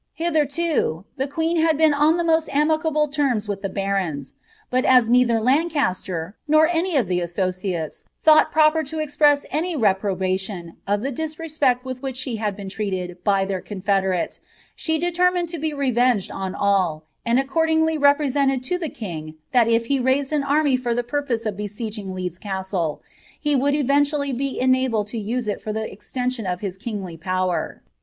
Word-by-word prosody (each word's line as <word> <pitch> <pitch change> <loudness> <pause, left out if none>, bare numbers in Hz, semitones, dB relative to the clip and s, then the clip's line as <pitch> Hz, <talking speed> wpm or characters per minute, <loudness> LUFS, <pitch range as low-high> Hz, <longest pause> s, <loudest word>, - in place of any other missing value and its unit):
Hilherlo 310 - 0
the 270 +1 -1
queou 325 +3 0
bad 320 -2 +3
been 315 -1 +4
on 300 +3 +3
the 345 - 0
mc«t 325 -1 +2
amicable 305 +1 +2
terms 275 -7 0
with 200 -1 -3
the 195 - -3
bsroiu; 190 -8 -2 0.4
but 255 0 +2
a* 255 -1 +7
neither! 240 -1 +4
if 295 +8 +1
i 185 - -1
" - - -52
nor 310 +1 +5
any 345 -1 +1
of 240 -8 +2
the 180 0 0
associates 180 -1 -3 0.2
thought 310 0 +6
proper 310 0 +4
to 310 +1 -5
exprcae 295 -1 +2
any 330 +3 -1
tvprobstiaa 190 - 0 0.2
«f 205 +1 +1
the 270 +4 -2
disreepect 305 -3 -1
witli 255 -1 -6
which 265 -2 -4
she 255 -3 -3
had 210 -2 -2
been 200 -1 -8
treated 185 -3 -4
by 195 -2 +2
their 190 -2 -3
cotOedentatibe 190 -2 -1 0.6
determined 350 0 +1
to 335 -1 -5
be 315 +1 -1
revenged 250 -6 +1
on 190 0 -4
all; 185 -6 +1 0.2
and 235 +2 +2
accordingly 320 +3 +1
represented 285 -2 +2
to 360 +8 -1
iht 320 -5 -5
king 160 -8 -6 0.2
thai 240 -3 +5
if 230 0 +2
he 275 +2 +1
raised 265 +3 +1
an 295 -2 +1
array 285 -1 +3
for 245 -2 -1
the 245 - 0
piupoee 245 -3 -2
of 210 -2 -2
besieging 210 -1 -5
Leeds 180 -1 -4
Cwtk, 190 -5 -3 0.4
he 295 -2 +1
would 280 +2 +2
eventually 285 0 +1
be 270 +2 -2
enabled 255 -4 +2
to 220 +2 -5
use 230 +3 -2
it 205 - -2
for 215 - -4
the 220 +1 -2
extenciou 245 -1 -3
of 180 - -4
his 195 -3 -4
kiniljr 195 -7 -6
power.' 185 -1 -2
250 Hz, 175 wpm, -22 LUFS, 195-295 Hz, 0.6 s, a